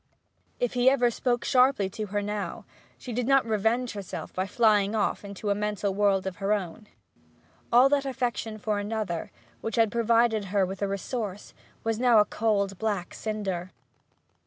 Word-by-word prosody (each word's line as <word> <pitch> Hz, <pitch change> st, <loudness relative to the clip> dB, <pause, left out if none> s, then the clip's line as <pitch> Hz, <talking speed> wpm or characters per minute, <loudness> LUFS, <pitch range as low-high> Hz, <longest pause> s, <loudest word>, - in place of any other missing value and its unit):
If 245 Hz, -, 0 dB
he 250 Hz, +1 st, +5 dB
ever 250 Hz, -3 st, +3 dB
spoke 240 Hz, +1 st, -1 dB
sharply 255 Hz, -6 st, +4 dB
to 215 Hz, +2 st, -5 dB
her 205 Hz, +1 st, -2 dB
now, 210 Hz, 0 st, -4 dB, 0.3 s
she 245 Hz, -, -7 dB
did 245 Hz, +1 st, -1 dB
not 270 Hz, -2 st, +4 dB
revenge 225 Hz, +3 st, 0 dB
herself 200 Hz, -3 st, -7 dB
by 185 Hz, +1 st, -2 dB
flying 210 Hz, -1 st, +3 dB
off 210 Hz, -1 st, 0 dB
to 205 Hz, +2 st, -4 dB
a -, -, +5 dB
mental 205 Hz, -1 st, -2 dB
world 195 Hz, -1 st, +2 dB
of 190 Hz, -1 st, -4 dB
her 200 Hz, +1 st, +1 dB
own; 205 Hz, +1 st, -4 dB, 0.8 s
all 245 Hz, +3 st, +7 dB
that 280 Hz, -1 st, +1 dB
affection 235 Hz, -4 st, -2 dB
for 210 Hz, -1 st, -1 dB
another, 205 Hz, -5 st, -3 dB, 0.3 s
which 225 Hz, -, -4 dB
had 225 Hz, -3 st, +3 dB
provided 230 Hz, -2 st, +2 dB
her 195 Hz, 0 st, +1 dB
with 190 Hz, +2 st, -7 dB
a 200 Hz, -, +1 dB
resource, 200 Hz, 0 st, -4 dB, 0.3 s
was 225 Hz, -1 st, -1 dB
now 245 Hz, -2 st, +5 dB
a 210 Hz, -, +6 dB
cold 200 Hz, -4 st, 0 dB
black 205 Hz, -5 st, -2 dB
cinder. 195 Hz, -5 st, -3 dB
215 Hz, 170 wpm, -27 LUFS, 200-235 Hz, 0.8 s, all